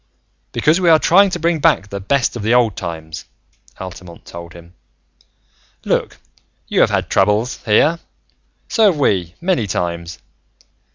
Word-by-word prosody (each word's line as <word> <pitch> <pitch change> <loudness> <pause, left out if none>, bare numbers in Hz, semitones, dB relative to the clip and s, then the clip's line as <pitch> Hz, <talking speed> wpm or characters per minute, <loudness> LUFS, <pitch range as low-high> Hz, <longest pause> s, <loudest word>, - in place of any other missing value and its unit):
"Because 160 +5 +2
we 175 - +3
are 160 - +7
trying 195 +5 +4
to 180 - -3
bring 170 0 0
back 100 -7 +2
the 100 - -5
best 125 +7 0
of 120 - -5
the 110 +4 +2
Old 115 -5 +2
Times," 80 -5 -7 0.5
Altamont 90 -2 -10
told 85 -1 -10
him. 85 0 -15 1.1
"Look, - - -1 0.5
you - - 0
have - - +5
had - - -1
troubles, 105 +5 +1
here. 150 +10 +3 0.7
So 225 -2 +2
have 190 -6 +3
we, 90 - 0
many 170 - 0
times. 85 -2 -4
105 Hz, 150 wpm, -18 LUFS, -, 1.1 s, are